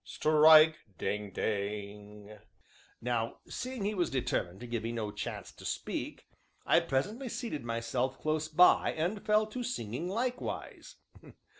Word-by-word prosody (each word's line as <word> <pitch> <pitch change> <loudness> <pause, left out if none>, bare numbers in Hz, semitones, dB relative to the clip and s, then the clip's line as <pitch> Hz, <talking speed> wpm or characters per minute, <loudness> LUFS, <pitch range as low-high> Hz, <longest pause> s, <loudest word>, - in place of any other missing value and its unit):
Strike! 155 0 +6 0.2
ding! 105 +1 -2
ding!" 105 +1 -4 0.6
Now 115 -1 -1
seeing 255 -5 -4
he 210 - 0
was 180 -4 0
determined 100 -8 -2
to - - -6
give 120 -2 -3
me 115 +1 -3
no 110 -3 -3
chance - - -6
to - - -15
speak, - - -4 0.4
I - - +5
presently 215 - -2
seated 225 - -4
myself 120 +3 -2
close 155 0 -1
by, 170 +3 +5
and 180 +6 -2
fell 215 0 +3
to 215 +4 -6
singing 150 - -3
likewise. 245 +5 -4
135 Hz, 135 wpm, -31 LUFS, -, 0.6 s, Strike